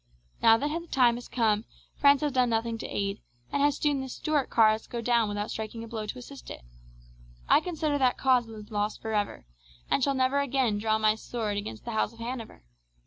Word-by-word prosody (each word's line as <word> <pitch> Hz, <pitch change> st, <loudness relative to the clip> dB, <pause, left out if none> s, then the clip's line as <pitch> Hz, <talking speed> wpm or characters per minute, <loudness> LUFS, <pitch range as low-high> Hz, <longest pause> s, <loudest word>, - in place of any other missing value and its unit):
Now 225 Hz, 0 st, +7 dB
that 285 Hz, -, -1 dB
the 335 Hz, +3 st, -4 dB
time 250 Hz, -6 st, +4 dB
has 240 Hz, +1 st, -7 dB
come, 220 Hz, -3 st, +1 dB, 0.3 s
France 280 Hz, 0 st, +5 dB
has 295 Hz, -1 st, 0 dB
done 255 Hz, -2 st, +2 dB
nothing 225 Hz, 0 st, -1 dB
to -, -, -5 dB
aid, 200 Hz, 0 st, -3 dB, 0.3 s
and 285 Hz, -, 0 dB
has 290 Hz, 0 st, +3 dB
seen 290 Hz, -2 st, +1 dB
the 265 Hz, -, -6 dB
Stuart 295 Hz, +1 st, -1 dB
cause 220 Hz, -1 st, +3 dB
go 240 Hz, -, -5 dB
down 235 Hz, -1 st, +2 dB
without 205 Hz, 0 st, -3 dB
striking 220 Hz, +1 st, -5 dB
a -, -, -8 dB
blow 220 Hz, -2 st, -5 dB
to 230 Hz, -, -5 dB
assist 270 Hz, +2 st, -10 dB
it. -, -, -9 dB, 0.8 s
I -, -, +6 dB
consider 310 Hz, -4 st, -1 dB
that 255 Hz, -2 st, +3 dB
cause 255 Hz, -3 st, +3 dB
is 215 Hz, -1 st, -11 dB
lost 210 Hz, 0 st, -1 dB
for 220 Hz, -1 st, -4 dB
ever, 205 Hz, -, -2 dB, 0.5 s
and 270 Hz, -, +2 dB
shall 275 Hz, 0 st, +2 dB
never 260 Hz, +2 st, +2 dB
again 260 Hz, -6 st, +1 dB
draw 220 Hz, 0 st, +1 dB
my 215 Hz, -1 st, +3 dB
sword 220 Hz, -1 st, -4 dB
against 110 Hz, -, -6 dB
the -, -, -4 dB
House 220 Hz, 0 st, 0 dB
of -, -, -17 dB
Hanover. 230 Hz, -, -6 dB
235 Hz, 215 wpm, -28 LUFS, 215-265 Hz, 0.8 s, Now